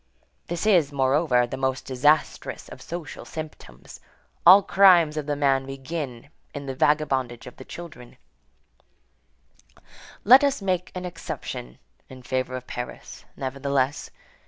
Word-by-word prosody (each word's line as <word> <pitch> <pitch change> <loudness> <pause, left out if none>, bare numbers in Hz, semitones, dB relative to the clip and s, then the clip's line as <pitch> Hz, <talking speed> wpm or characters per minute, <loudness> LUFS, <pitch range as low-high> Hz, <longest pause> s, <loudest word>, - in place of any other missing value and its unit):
This 175 +3 -3
is, 175 -9 +4
moreover, 135 -2 +2
the 125 +2 -6
most 130 -1 -2
disastrous 145 +4 0
of - - -11
social 170 -2 -7
symptoms. 155 - -10 0.5
All 195 +3 +9
crimes 175 -7 +5
of 150 -1 -4
the 145 - 0
man 135 -2 +1
begin 135 -2 -6 0.3
in 140 0 -6
the 135 - -4
vagabondage 130 -4 0
of 125 - -11
the 130 - -11
child. 170 -2 -9 2.3
Let 255 +6 +8
us 280 -1 +1
make 185 -3 -2
an 180 0 -5
exception 165 - -7 0.3
in 130 -1 -12
favor 130 0 -2
of 130 0 -7
Paris, 125 -1 -8
nevertheless. 140 +1 -2
140 Hz, 130 wpm, -24 LUFS, 130-170 Hz, 2.3 s, All